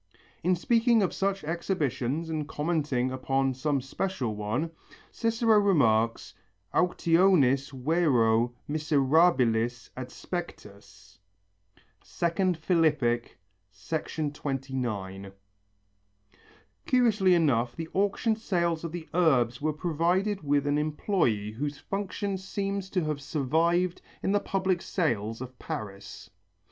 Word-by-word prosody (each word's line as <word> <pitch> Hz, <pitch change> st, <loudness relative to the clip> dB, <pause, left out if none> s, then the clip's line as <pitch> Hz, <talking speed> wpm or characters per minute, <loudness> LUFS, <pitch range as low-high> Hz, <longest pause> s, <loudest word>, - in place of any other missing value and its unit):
In 180 Hz, +2 st, +3 dB
speaking 230 Hz, +3 st, +3 dB
of 185 Hz, -, -1 dB
such 195 Hz, 0 st, -1 dB
exhibitions 155 Hz, -3 st, -2 dB
and 155 Hz, -2 st, -3 dB
commenting 150 Hz, -6 st, -1 dB
upon 135 Hz, +1 st, 0 dB
some 140 Hz, +1 st, -1 dB
special 135 Hz, -, -3 dB
one, 110 Hz, +10 st, -2 dB, 0.4 s
Cicero 230 Hz, -1 st, +2 dB
remarks, 115 Hz, -, +2 dB, 0.4 s
Auctionis 165 Hz, -6 st, +3 dB
vero 125 Hz, -5 st, +2 dB
miserabilis 135 Hz, -6 st, +2 dB
adspectus 105 Hz, -, -8 dB, 0.8 s
(Phil., 170 Hz, -1 st, +1 dB
II, 120 Hz, -, -2 dB
29). 125 Hz, -10 st, -4 dB, 1.6 s
Curiously 215 Hz, -8 st, +4 dB
enough 125 Hz, -8 st, +2 dB
the 165 Hz, -1 st, -6 dB
auction 205 Hz, +3 st, +1 dB
sales 170 Hz, -6 st, -1 dB
of 165 Hz, -, -4 dB
the 170 Hz, -1 st, -7 dB
Urbs 130 Hz, -9 st, +2 dB
were 155 Hz, +1 st, +1 dB
provided 175 Hz, +6 st, 0 dB
with 145 Hz, -1 st, +1 dB
an 145 Hz, 0 st, +1 dB
employé 150 Hz, -, 0 dB
whose 145 Hz, +5 st, -4 dB
function 200 Hz, 0 st, -3 dB
seems 195 Hz, 0 st, -3 dB
to 185 Hz, -3 st, 0 dB
have 150 Hz, -2 st, -2 dB
survived 165 Hz, +6 st, 0 dB, 0.2 s
in 190 Hz, -, +1 dB
the 205 Hz, -, +3 dB
public 190 Hz, -3 st, -1 dB
sales 115 Hz, -, -1 dB
of 130 Hz, 0 st, -9 dB
Paris. 100 Hz, -2 st, -7 dB
150 Hz, 100 wpm, -28 LUFS, 125-180 Hz, 1.6 s, Curiously